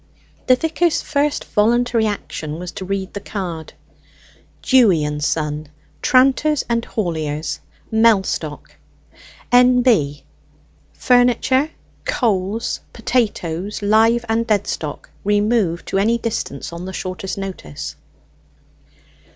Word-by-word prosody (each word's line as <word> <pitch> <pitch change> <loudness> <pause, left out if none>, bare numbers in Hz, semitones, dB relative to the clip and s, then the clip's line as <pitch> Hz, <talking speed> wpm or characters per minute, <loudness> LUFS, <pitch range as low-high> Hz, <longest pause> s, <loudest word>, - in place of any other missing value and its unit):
The 255 - +7
vicar's 325 +4 0
first 295 0 0
voluntary 230 +1 +2
action 160 -7 -4
was 180 +1 -6
to 190 - -7
read 195 0 -3
the 200 - -4
card: 175 -6 -5 0.9
DEWY 220 - +5
AND 150 0 -3
SON, 150 0 -1 0.3
TRANTERS 275 +2 +3
AND 235 0 0
HAULIERS, 160 -6 -3 0.3
MELLSTOCK. 195 -9 +1 0.7
NB. 245 - +4 0.7
Furniture, 250 +3 +3 0.4
Coals, 210 -2 0
Potatoes, 205 -4 -1
Live 225 +3 +4
and 225 +1 0
Dead 205 -2 +2
Stock, 150 -2 -5 0.2
removed 205 -4 +1
to 195 - +1
any 225 +4 +3
distance 215 - -4
on 170 +1 -6
the 190 - -6
shortest 185 +1 -4
notice. 185 - -6
210 Hz, 100 wpm, -20 LUFS, 170-240 Hz, 0.9 s, The